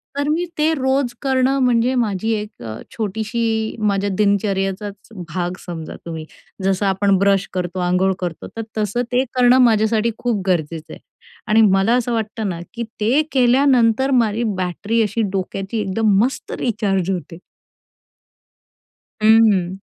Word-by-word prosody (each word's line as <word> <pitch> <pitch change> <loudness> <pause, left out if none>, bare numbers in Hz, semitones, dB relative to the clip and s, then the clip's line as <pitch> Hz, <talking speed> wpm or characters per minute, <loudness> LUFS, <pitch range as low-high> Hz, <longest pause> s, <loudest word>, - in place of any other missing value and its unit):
तर, 285 0 -1
मी 330 +3 0
ते 310 +1 +2
रोज 265 -2 0
करणं 265 0 +1
म्हणजे 245 +1 +2
माझी 220 -2 0
एक 210 - -5
अ, 110 -1 -6 0.2
छोटीशी 220 +1 -2 0.2
माझ्या 200 0 -1
दिनचर्येचाच 200 0 -1 0.3
भाग 180 +1 -2
समजा 165 -3 -6
तुम्ही. 160 -2 -6 0.4
जसं 195 +1 +1
आपण 195 0 +2
ब्रश 195 0 +2
करतो, 180 0 -3
अंघोळ 185 +2 +2
करतो, 175 -3 -5
तर - - -1 0.2
तसं 215 +3 0
ते 250 +1 +2
करणं, 250 0 +5
माझ्यासाठी 220 0 +2
खूप 235 -5 -1
गरजेचं 165 -3 -2
आहे - - -11 0.5
आणि 220 +1 +4
मला 195 +2 +4
असं 245 -1 0
वाटतं 220 -1 -2
ना, 170 -2 -4
की 235 0 -4 0.2
ते 245 +8 +3
केल्यानंतर, 255 -1 +3
माझी 220 +2 -1
बॅटरी 200 +5 -1
अशी 215 +2 -1
डोक्याची 195 +2 -3
एकदम 205 +1 +1
मस्त 260 +3 -3
रिचार्ज 195 -6 0
होते. 175 -2 -5 1.9
हं. 215 -5 +4
215 Hz, 140 wpm, -20 LUFS, 190-235 Hz, 1.9 s, करणं